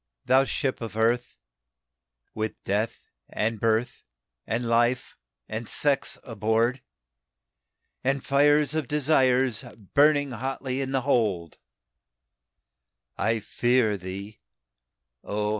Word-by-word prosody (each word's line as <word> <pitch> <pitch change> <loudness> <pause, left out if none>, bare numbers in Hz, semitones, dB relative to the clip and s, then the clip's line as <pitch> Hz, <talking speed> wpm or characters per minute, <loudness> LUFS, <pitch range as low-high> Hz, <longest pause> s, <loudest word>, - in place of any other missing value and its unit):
"Thou 130 +1 +5
Ship 135 -2 -2
of 110 -2 -6
Earth, 120 +2 +1 1.0
with 110 0 -3
Death, 105 +3 -2 0.2
and 110 +1 -1
Birth, 115 +3 0 0.5
and 115 +2 -1
Life, 120 +2 +1 0.3
and 110 +1 -5
Sex 140 -2 +1
aboard, 115 +3 0 1.2
And 135 0 0
fires 145 +1 +4
of 155 -4 -1
Desires 135 -4 +2 0.3
burning 145 -1 +4
hotly 130 +2 -3
in 135 -1 -3
the 135 -1 +1
hold, 105 - 0 1.6
I 110 +1 0
fear 120 0 +2
thee, 100 +3 -7 0.8
O! 105 0 -2
120 Hz, 100 wpm, -26 LUFS, 110-135 Hz, 1.6 s, Thou